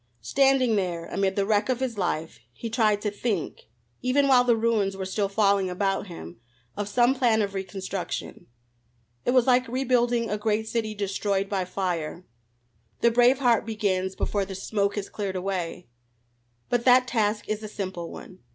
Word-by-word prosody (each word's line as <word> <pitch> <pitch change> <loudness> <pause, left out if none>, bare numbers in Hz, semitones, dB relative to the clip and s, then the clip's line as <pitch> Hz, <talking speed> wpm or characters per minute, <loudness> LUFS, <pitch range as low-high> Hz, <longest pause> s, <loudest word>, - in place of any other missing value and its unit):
Standing 265 - +3
there 175 -3 -2
amid 195 +1 -1
the 200 - +1
wreck 210 +2 +1
of 255 -1 +1
his 260 -3 -2
life, 165 - -2
he 230 - -6
tried 215 -3 +2
to 210 - 0
think, 205 - -3 0.3
even 275 +3 +2
while 255 -2 +6
the 240 -2 +3
ruins 220 -4 +1
were 190 - -4
still 195 +1 -1
falling 200 -2 +2
about 195 +2 -1
him, 100 - -10 0.4
of 205 0 -3
some 240 +4 +3
plan 235 -5 +2
of 200 -1 -3
reconstruction. 190 -1 -5 0.8
It - - 0
was 250 -2 +5
like 255 0 +3
rebuilding 245 -2 +1
a 210 -1 -2
great 220 +1 0
city 220 -1 -2
destroyed 200 0 -1
by 195 -2 -1
fire; 180 -2 -3 0.8
the 235 - +4
brave 245 +3 +5
heart 245 -4 +3
begins 195 -4 -1
before 205 -1 -1
the 190 0 -6
smoke 200 +1 -1
has 205 -2 -3
cleared 200 -3 -4
away. 180 -2 -3 0.8
But 240 -1 0
that 250 0 +6
task 215 -3 0
is 215 0 -2
a 215 - -6
simple 185 -5 -5
one. 185 - -11
205 Hz, 170 wpm, -26 LUFS, 190-235 Hz, 0.8 s, while